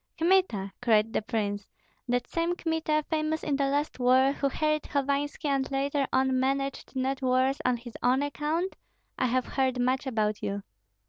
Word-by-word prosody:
"Kmita!" 330 - +2
cried 225 -2 +3
the - - +1
prince, 205 -3 -2 0.4
"that 245 0 0
same 335 +1 -1
Kmita, 320 -3 0
famous 315 0 -1
in 290 - 0
the 275 0 +1
last 285 0 -1
war, 255 +2 +5
who 280 0 0
harried 305 +2 0
Hovanski, 285 +2 -1
and 275 -1 0
later 275 0 0
on 260 0 +2
managed 275 +1 -1
not 265 +1 -1
worse 260 +1 +2
on 250 -1 +2
his 235 0 -10
own 255 +3 +3
account? 305 +6 -2 0.4
I 255 - +2
have 255 +1 +1
heard 260 -2 0
much 255 +2 +1
about 215 -4 0
you." 200 0 -3
270 Hz, 170 wpm, -28 LUFS, 250-290 Hz, 0.4 s, war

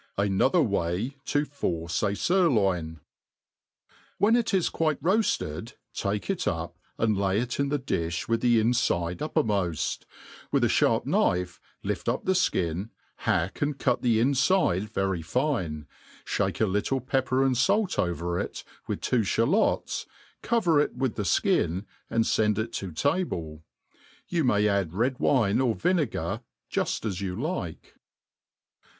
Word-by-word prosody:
• - - +3
Another 130 - +3
way 100 +7 -1
fa 145 +1 +1
force 85 - -2
a 100 -1 +1
Sirloin 100 - +2
t, 80 - -21 1.2
WHEN 220 +3 +4
it 235 -1 +1
is 190 -4 +2
quite 155 -3 0
roafled, 135 - 0 0.2
take 100 -1 -2
it - - -1
up, - - -2 0.2
and 110 -2 +2
lay 95 0 +1
it 120 +2 -3
in 140 0 +1
the 145 - +1
difh 85 - -2
with 115 0 +1
the 120 -2 +4
ixifide 110 -7 +1
uppermoft; 100 - -1 0.4
with - - +2
a - - +3
(harp - - +3
knife 90 0 +1 0.2
life - - -2
up - - -2
the - - +2
fkin, 95 - 0 0.3
hack 95 -5 -1
and 145 -1 0
cut - - +1
the 115 -3 +3
infide 135 - +2
very 95 -4 -1
fine, 85 - -1 0.4
fhake - - -1
a 110 - +4
little 105 +7 0
pepper 130 +1 +1
and 135 -1 +3
ifalc 185 - +1
over 85 -1 -1
it, - - -5 0.2
with - - -3
two 125 - +2
(balots, 135 - +1 0.3
cover 180 -10 +2
it 145 - 0
with 130 -1 -1
the - - -3
ftin^ 90 0 +1 0.2
and 115 - +2
feitd 105 -2 +2
it 110 +1 -2
to 95 -3 -4
table. 80 - -1 0.7
You 170 -4 0
may 105 -4 +3
ad^ 100 -5 +1
red 125 +6 0
wine 120 -5 +3
or 120 -4 +1
vinegar, 170 -8 0 0.3
jufl - - -1
as 100 -3 -2
you 95 0 -3
tike. 130 - -4
110 Hz, 150 wpm, -27 LUFS, 90-140 Hz, 1.2 s, WHEN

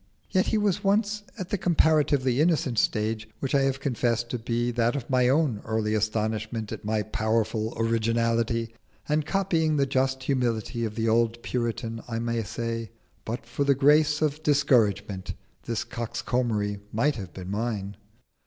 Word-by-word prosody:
Yet 185 -1 +2
he 220 - +2
was 205 -1 +1
once 205 +1 +1 0.2
at 185 -3 -5
the 205 - -1
comparatively 150 -6 +3
innocent 150 -8 +2
stage 110 0 0
which 135 - -3
I 140 - +4
have 135 0 0
confessed 120 -3 0
to 125 - -2
be 120 +1 -1
that 120 +1 +1
of 135 -2 -5
my 125 -1 +4
own 135 -7 +2
early 110 -1 -1
astonishment 110 0 -1
at - - -6
my 105 0 0
powerful 110 +1 -1
originality; 115 0 +1 0.3
and 150 0 0
copying 165 -6 +1
the 140 - +3
just 130 0 0
humility 120 -3 -1
of 105 -1 -5
the 115 0 0
old 115 +1 +2
Puritan, 115 -2 -2
I 115 -1 -3
may 115 0 -1
say, 115 +1 -4 0.4
"But 115 +1 -4
for 120 +4 -2
the 140 -1 +3
grace 150 +2 +4
of 150 0 0
discouragement, 105 - +2 0.3
this 115 -2 -1
coxcombry 115 -3 -2
might 140 +5 +1
have 95 -5 -7
been 95 0 -7
mine." 105 -2 -2
120 Hz, 160 wpm, -26 LUFS, 110-140 Hz, 0.4 s, I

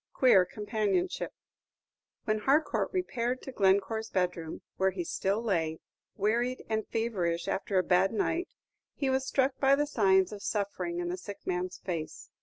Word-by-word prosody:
QUEER 200 -8 +6
COMPANIONSHIP 210 -2 -1 0.9
When 215 0 +1
Harcourt 280 +8 +2
repaired 255 -10 -1
to 265 - -6
Glencore's 200 +1 +2
bedroom, 180 -3 -2
where 190 0 +3
he 185 -2 -3
still 195 +6 -1
lay, 165 -7 0 0.4
wearied 235 +5 0
and 220 -1 -1
feverish 185 -7 -1
after 195 0 -1
a 185 - +4
bad 185 +2 +3
night, 330 - 0 0.5
he 275 -2 0
was 265 0 0
struck 265 0 +1
by 275 0 +5
the 295 +1 +1
signs 190 -9 +3
of 205 -1 -7
suffering 195 -5 -2
in 175 0 -2
the 180 - -2
sick 200 +2 -9
man's 180 0 -2
face. 165 -4 -5
205 Hz, 155 wpm, -30 LUFS, 185-240 Hz, 0.9 s, QUEER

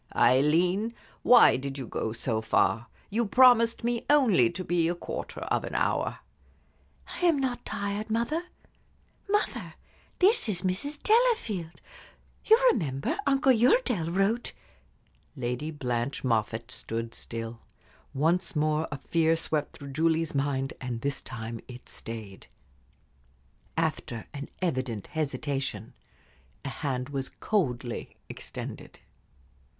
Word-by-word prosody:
"Aileen, 175 - +3 0.3
why 245 - +7
did 135 +1 -5
you 135 - -4
go 110 - -3
so 115 -1 -1
far? 110 0 +2 0.2
You 230 +4 +1
promised 235 -1 +5
me 235 0 0
only 235 - +5
to 185 - -5
be 170 -2 +1
a 175 - -1
quarter - - -6
of - - 0
an - - -5
hour." - - 0 1.0
"I 355 - +4
am 330 -4 +4
not 255 -3 -1
tired, 200 +2 -3
mother. 235 +10 0 0.8
Mother, 415 +1 -1 0.4
this 385 - +4
is 180 -3 -1
Mrs. 225 +11 -2
Delafield. 425 - +2 0.7
You 445 - +8 0.2
remember, 150 - -2
Uncle 275 0 +4
Uredale 240 - +3
wrote 195 +7 0 0.4
" - - -38
Lady 125 +6 -2
Blanche 125 -3 -2
Moffatt 115 0 0
stood 115 -2 -3
still. 115 0 -6 0.5
Once 165 +6 +1
more 155 +1 +1
a 140 - -3
fear 165 +3 +2
swept 155 -2 -2
through 140 - -9
Julie's 160 +2 +1
mind, 135 -1 -1
and 120 -3 -4
this 140 +1 -2
time 115 -1 -6
it 125 0 -11
stayed. 110 -4 -8 1.3
After 155 -8 -2
an 140 0 -6
evident 130 - -1
hesitation, 140 -7 -2 0.7
a - - -2
hand 135 -2 -3
was 135 -2 -3
coldly 125 - -2
extended. - - -8
155 Hz, 125 wpm, -28 LUFS, -, 1.3 s, You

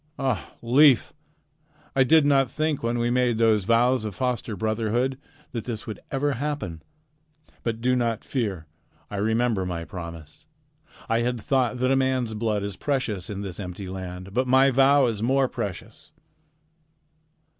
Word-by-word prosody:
Ah, 135 -1 -2
Leif! 130 +2 +5 0.8
I 135 - +5
did 155 +3 +5
not 135 -3 +3
think 155 -2 -1
when 115 +1 -1
we 120 0 0
made 125 -2 +2
those 110 -4 +3
vows 120 +2 +3
of 105 -3 -5
foster 125 -3 -2
brotherhood 110 +5 0 0.4
that 115 -3 -5
this 110 -4 -5
would 110 -3 -6
ever 145 +1 0
happen. 135 - -4 0.8
But 115 -1 -3
do 125 +1 +2
not 115 -3 -1
fear. 100 - -3 0.5
I 100 - -4
remember 110 0 +1
my 85 -2 -4
promise. 85 - -9 0.6
I 115 0 +2
had 120 0 -1
thought 130 0 0
that 130 +1 +1
a - - +4
man's 130 -3 +1
blood 105 -2 -1
is 100 -2 -5
precious 115 -10 -2
in 100 -1 -4
this 95 -2 -6
empty 95 0 -6
land, 95 0 -7
but 130 +3 +1
my 130 +2 +5
vow 135 +1 +5
is 110 -4 -2
more 135 +3 +2
precious." 105 -8 -6
115 Hz, 155 wpm, -25 LUFS, 105-130 Hz, 0.8 s, Leif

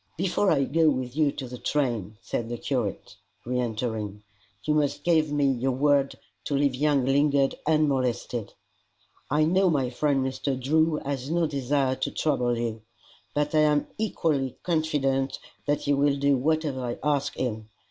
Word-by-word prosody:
"Before 190 +3 +1
I 140 -5 +3
go 160 +4 +3
with 130 -2 -2
you 150 -2 +3
to 135 - -6
the 125 0 -8
train," 120 -6 -1
said 115 +1 -3
the 120 - -3
curate, 120 -7 -3 0.3
re 125 +1 -1
entering, 110 -3 -3 0.4
"you 150 - +1
must 145 -1 0
give 160 -3 +2
me 145 -1 +2
your 130 +1 0
word 140 +1 +2 0.3
to 145 - -1
leave 140 -1 +2
young 140 0 +2
Lingard 140 0 +3
unmolested. 130 -7 0 0.8
I 150 +2 +3
know 185 +4 +3
my 135 -6 0
friend 135 0 +1
Mr. 130 0 -2
Drew 155 +4 +2
has 135 -1 -3
no 170 +1 +2
desire 140 -2 0
to - - -1
trouble 125 -6 0
you, 115 -1 -3 0.5
but 150 +1 0
I 155 - +4
am 150 -1 +3
equally 150 - -1
confident 140 -5 0 0.3
that 145 0 +1
he 145 - +1
will 140 0 +2
do 140 0 +3
whatever 145 -1 0
I 120 -1 -3
ask 145 -1 0
him. 110 -4 -3
140 Hz, 165 wpm, -26 LUFS, 125-150 Hz, 0.8 s, I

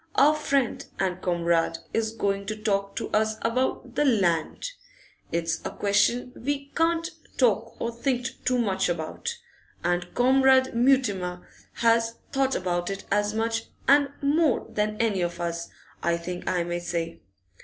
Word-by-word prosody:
Our 295 +2 +6
friend 280 -5 0
and 185 -1 -1
comrade 170 -2 +1 0.2
is 220 -1 0
going 200 -3 -1
to 215 - -2
talk 200 -2 -1
to - - -3
us 215 0 +2
about 250 +1 -1
the 290 +3 +2
Land. 195 - +1 0.6
It's 165 -1 -1
a - - -2
question 235 +5 +1
we 280 +2 -3
can't 330 0 +2 0.3
talk 230 -2 +1
or 230 - -1
think 250 +1 -1
too 250 0 +2
much 195 -6 +1
about, 175 - -3 0.5
and 175 0 0
Comrade 260 +1 +5
Mutimer 220 -8 +1 0.3
has 230 0 +2 0.2
thought 270 -1 +1
about 175 -1 -1
it 195 0 -5
as 205 +1 +1
much 225 0 0 0.2
and 280 0 +6
more 295 -1 +3
than 215 -1 -1
any 215 -5 +1
of 175 0 -2
us, 170 0 -3 0.3
I 170 0 +1
think 175 +1 -6
I 180 -2 +1
may 175 0 -2
say. 170 -1 -3
215 Hz, 150 wpm, -26 LUFS, 180-255 Hz, 0.6 s, Our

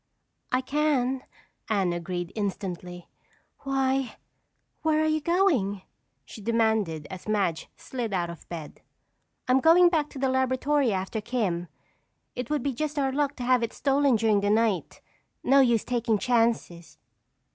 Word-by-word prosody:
"I 255 - +2
can," 265 -2 0 0.5
Anne 195 -5 +1
agreed 175 0 -4
instantly. 180 -4 -5 0.5
"Why, 270 -1 0 0.7
where 310 -1 +2
are 315 - +2
you 310 0 +1
going?" 290 - +1 0.4
she 215 - -11
demanded 220 -8 0
as 185 +1 -9
Madge 195 -6 0
slid 240 -4 -5
out 175 -3 -1
of 170 - -13
bed. 160 -3 -8 0.7
"I'm 255 +1 +4
going 340 +4 +6
back 310 -4 0
to - - -11
the 265 0 0
laboratory 260 +1 +1
after 195 +3 -2
'Kim.' 200 -7 -2 0.7
It 250 -1 -5
would 295 -4 -1
be 280 - -1
just 300 +4 -3
our 270 -2 +1
luck 285 +1 0
to 250 - -6
have 250 0 +3
it 230 - -2
stolen 275 -2 +2
during 215 -2 +2
the 205 - 0
night. 215 -4 0 0.4
No 275 +2 +5
use 235 -4 +3
taking 235 -3 0
chances." 225 -9 0
235 Hz, 145 wpm, -27 LUFS, 195-270 Hz, 0.7 s, going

